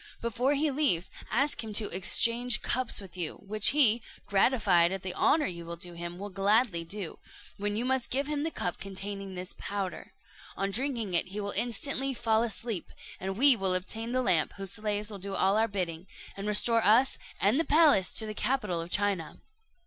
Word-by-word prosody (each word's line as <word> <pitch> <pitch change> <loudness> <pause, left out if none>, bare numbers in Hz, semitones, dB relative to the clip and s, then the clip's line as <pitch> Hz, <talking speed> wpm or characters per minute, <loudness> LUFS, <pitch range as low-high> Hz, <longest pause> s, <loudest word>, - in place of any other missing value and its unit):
Before 245 +5 0
he 295 +1 +1
leaves, 260 - +1 0.2
ask 275 +3 +1
him 220 -1 -6
to 210 0 +3
exchange 230 +5 +2
cups 255 0 0
with 195 -3 -11
you, 170 -4 -3
which 210 +1 +1
he, 240 -5 +5 0.2
gratified 195 -5 +3
at 195 -1 -4
the 185 -1 -3
honour 305 - +3
you 170 -2 -5
do 175 0 -6
him, 170 +1 -7
will 200 +2 -7
gladly 200 -1 +2
do, 190 0 -6 0.4
when 205 +1 -2
you 230 +3 -2
must 265 -1 0
give 275 +3 0
him 295 0 -2
the 320 - -1
cup 175 - -4
containing 195 0 -6
this 180 +1 -4
powder. 200 -2 -5 0.4
On 195 0 -1
drinking 235 -4 -1
it 170 - +1
he 200 +3 -6
will 200 -1 -3
instantly 265 +3 -1
fall 225 -2 +1
asleep, 230 -4 -3 0.3
and 190 +1 -4
we 275 +1 +7
will 190 -4 0
obtain 225 +5 -3
the 255 0 0
lamp, 175 -8 +2
whose 195 -2 -6
slaves 210 0 -2
will 200 - -8
do 195 +1 -5
all 195 +1 +2
our 220 +1 +3
bidding, 180 -4 -4 0.3
and 200 +1 -5
restore 225 +2 +3
us 235 +6 +4 0.2
and 210 +9 +3
the - - +3
palace 300 - +4
to 220 - -1
the 215 - -5
capital 210 -7 -1
of 165 - -8
China." 200 -4 -1
205 Hz, 195 wpm, -29 LUFS, 190-240 Hz, 0.4 s, we